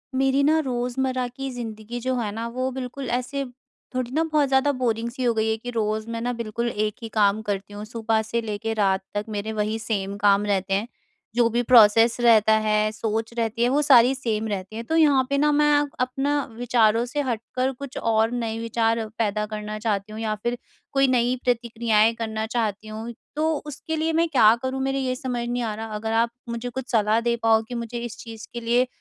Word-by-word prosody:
मेरी 270 +1 +2
ना 310 +3 +4
रोज़मर्रा 255 0 -1
की 270 +2 -6
ज़िंदगी 230 -1 -6
जो 255 +1 -1
है 225 -4 -2
ना, 225 +2 -4
वो 255 +2 -2
बिल्कुल 260 +1 -5
ऐसे 255 +3 -2 0.5
थोड़ी 250 -1 -2
ना 315 +3 +2
बहुत 305 -3 +2
ज़्यादा 265 +2 +3
बोरिंग 235 -3 -1
सी 255 +1 -5
हो 240 -1 +3
गई 220 0 0
है 220 - +1
कि 245 +2 -7
रोज़ 215 -1 -1
मैं 230 0 -3
ना 245 +1 -1
बिल्कुल 235 0 -3
एक 210 -1 -1
ही 225 - -5
काम 210 0 +3
करती 205 -1 -4
हूँ। 205 +1 -6
सुबह 225 0 0
से 230 +2 -2
लेके 225 0 -3
रात 195 -3 +1
तक 205 0 -2
मेरे 210 +1 -3
वही 215 +1 -1
सेम 200 -3 -2
काम 205 0 +3
रहते 195 -1 0
हैं। 200 +4 0 0.5
जो 240 -1 +4
भी 240 +1 +1
प्रोसेस 230 -1 +6
रहता 220 -2 +5
है, 215 0 +2
सोच 220 +1 -3
रहती 230 0 0
है, 245 - +3
वो 285 +3 +2
सारी 260 -3 +6
सेम 225 -4 -2
रहती 200 0 -4
हैं। 230 - -4
तो 320 - -1
यहाँ 290 -5 +5
पे 280 - +1
ना 300 +1 +3
मैं 295 0 +3 0.3
अपना 270 +3 0
विचारों 235 -1 +3
से 270 +4 -2
हटकर 255 +1 -2
कुछ 280 -2 -7
और 225 0 +2
नए 230 -2 -2
विचार 230 0 0
पैदा 210 -1 0
करना 210 0 -5
चाहती 210 -2 -2
हूँ, 215 - -7
या 215 -1 -1
फिर 240 +1 -1 0.3
कोई 275 0 +3
नई 250 -1 +2
प्रतिक्रियाएँ 230 -2 +2
करना 220 -1 -3
चाहती 220 -3 -2
हूँ। 220 +2 -6 0.2
तो 315 +1 +1
उसके 300 +2 -5
लिए 320 +1 0
मैं 335 - +2
क्या 225 -7 +6
करूँ, 260 0 -2
मेरे 270 0 0
ये 255 -1 -1
समझ 245 -2 -3
नहीं 245 0 -1
आ 220 -2 -2
रहा। 225 +1 -5
अगर 220 +1 -3
आप 230 +1 +3 0.2
मुझे 235 +1 -4
कुछ 255 +1 -6
सलाह 215 -1 +3
दे 235 - +2
पाओ 225 -1 +5
कि 245 - -6
मुझे 235 0 -4
इस 235 0 -7
चीज़ 225 0 -9
के 240 - -4
लिए 240 +2 +2
230 Hz, 215 wpm, -24 LUFS, 220-255 Hz, 0.5 s, प्रोसेस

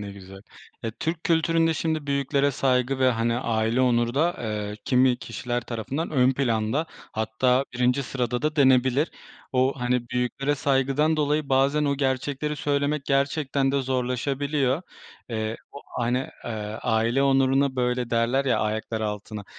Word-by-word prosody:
Ne 100 -1 -6
güzel. 95 0 -12 0.4
Eee, 115 - -1
Türk 165 +1 -2
kültüründe 165 0 +2
şimdi 155 -1 -2
büyüklere 140 0 +1
saygı 130 -1 +1
ve, 130 -1 +4
hani, 115 0 0
aile 115 0 0
onuru 120 -1 +2
da, 165 +5 +2
eee, 105 -2 -3
kimi 125 -1 +3
kişiler 120 -1 -4
tarafından 125 +7 -4
ön 130 -3 +3
planda, 120 +2 0 0.3
hatta 120 +4 +1
birinci 125 +2 +2
sırada 125 -1 -2
da 155 0 -1
denebilir. 130 +1 +4 0.4
O, 130 +1 +2
hani, 125 -1 0
büyüklere 125 +4 -1
saygıdan 140 +3 +1
dolayı 150 -1 0
bazen 140 +3 +2
o 140 -1 +1
gerçekleri 140 +2 -1
söylemek 145 0 0
gerçekten 140 0 +1
de 140 -1 +1
zorlaşabiliyor. 135 +3 -1 0.5
Eee, 110 -1 -3 0.2
o, - - -8 0.2
hani, 120 +2 +1 0.3
eee, - - -4 0.3
aile 115 +4 +1
onuruna 135 0 +3
böyle 125 -1 0
derler, 120 +4 +1
ya, 130 - +2
ayaklar 110 +1 -2
altına, 105 0 -4
130 Hz, 145 wpm, -25 LUFS, 120-140 Hz, 0.5 s, ve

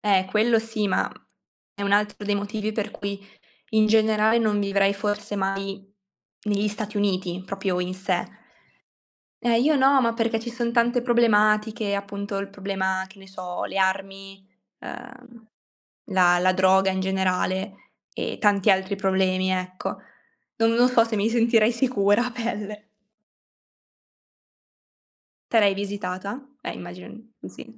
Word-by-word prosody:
Eh, 195 -3 +2
quello 225 +2 +3
sì, 220 -2 -2
ma, - - +2
mhmm, - - -19 0.5
è 200 - -7
un 200 0 0
altro 210 0 +1
dei 205 - 0
motivi 210 +1 -3
per 215 -1 -3
cui 200 -2 -5 0.5
in 215 0 +4
generale 220 0 +3
non 215 -2 +1
vivrei 200 0 +2
forse 205 0 -3
mai 195 0 -3 0.6
negli 205 0 +1
Stati 210 0 -5
Uniti 185 -3 -1
proprio 195 -2 -2
in 180 +1 -2
sé. 190 +1 -1 1.2
Eh 235 -1 +3
io 300 +5 +3
no, 270 0 +5
ma 230 -1 +1
perché 230 -1 0
ci 235 +1 -6
son 235 -1 -2
tante 240 +1 +2
problematiche, 215 -2 +2
appunto 200 0 -4
il 200 0 -3
problema, 190 -1 -2
che 190 +1 -18
ne 195 - -14
so, 185 -2 -6
le - - -6
armi, 195 0 -2 0.3
ehm, 245 -2 -11 0.6
la 180 -3 +4
la 185 +1 +3
droga 190 +1 +4
in 190 0 -1
generale 190 +1 -1 0.4
e - - -5
tanti 205 -1 +4
altri 190 +1 +1
problemi, 190 -1 +1
ecco. 185 0 -3 0.6
No 225 - +1
non 235 +2 +4
so 240 -2 +5
se 225 -1 -3
mi 210 +2 +1
sentirei 230 -1 +3
sicura, 235 -3 +2
a 250 - -4
pelle. 210 -3 -5 2.6
Te 230 - +5
l'hai 200 -2 +4
visitata? 200 +3 -5 0.2
Eh, - - -4
immagino 175 +1 -9 0.2
di - - -10
sì. 230 -2 -13
205 Hz, 145 wpm, -24 LUFS, 195-225 Hz, 2.6 s, no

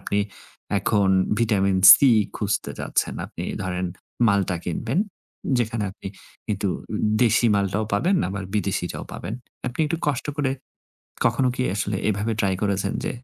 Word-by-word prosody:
আপনি 100 - -1 0.6
এখন 100 0 +2 0.3
vitamin 100 -4 +2
C 140 - +6 0.3
খুঁজতে 100 -2 -1
যাচ্ছেন, - - -1
আপনি - - -7 0.2
ধরেন 90 0 -2 0.4
মালটা 100 -3 +1
কিনবেন। 115 - -2 0.6
যেখানে 115 -2 -1
আপনি 95 - -11 0.4
কিন্তু 105 -2 -1 0.2
উ - - -1 0.3
দেশি 115 0 +4
মালটাও 100 +1 0
পাবেন 170 - +2 0.2
বা 100 - -3
বিদেশিটাও 100 -4 -2
পাবেন। 110 - -5 0.3
আপনি 125 +5 -5
একটু 165 +3 -1
কষ্ট 140 -3 -1
করে 145 -3 0 0.7
কখনো 120 +2 +3
কি 125 - -1
আসলে 100 0 -1
এভাবে 105 +2 0
ট্রাই 95 -2 +1
করেছেন 100 -1 0
যে, - - -1
105 Hz, 140 wpm, -23 LUFS, 100-115 Hz, 0.7 s, C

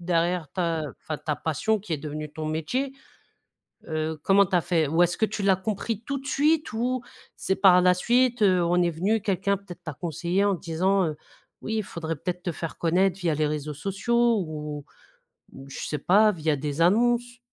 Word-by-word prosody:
derrière 170 -1 0
ta 170 -3 -1 0.2
enfin 155 -2 -4
ta 150 -2 -3
passion 190 +8 0
qui 200 -3 -7
est 155 - -1
devenue 150 +1 -6
ton 155 0 -5
métier. 160 - -2 0.9
Heu, 155 0 -2
comment 200 +1 +5
tu 180 - +1
as - - +4
fait? 165 -3 +1
Ou 165 +4 +3
est-ce 175 0 +2
que 220 - +2
tu 210 -1 -5
l'as 195 -1 +4
compris 215 +2 -3
tout 280 +2 -3
de 270 - -12
suite 300 +3 +1
ou 245 +3 -1 0.3
c'est 190 - -1
par 185 -2 +6
la 180 0 +5
suite, 240 +4 +2
heu, 185 -3 +4
on 175 +1 +2
est 175 - +2
venu, 195 +7 0
quelqu'un 200 0 0
peut-être 190 -3 -12
t'a 160 -2 -5
conseillé 170 +5 -1
en 200 -1 +2
disant, 185 +3 +1
heu, 155 -2 -3 0.5
«Oui, 220 - -2
il - - 0
faudrait 165 -3 -5
peut-être 180 +4 -5
te 175 - -1
faire 165 0 -6
connaître 180 +2 +2
via 170 -4 +1
les 150 0 +1
réseaux 150 0 -3
sociaux 220 - +1
ou 150 -2 -6 0.7
ou 135 +1 -12
je 135 - -7
sais 150 - -3
pas, 210 +8 +4
via 155 -4 0
des 145 +2 -4
annonces». 240 +6 +2
180 Hz, 200 wpm, -26 LUFS, 160-210 Hz, 0.9 s, par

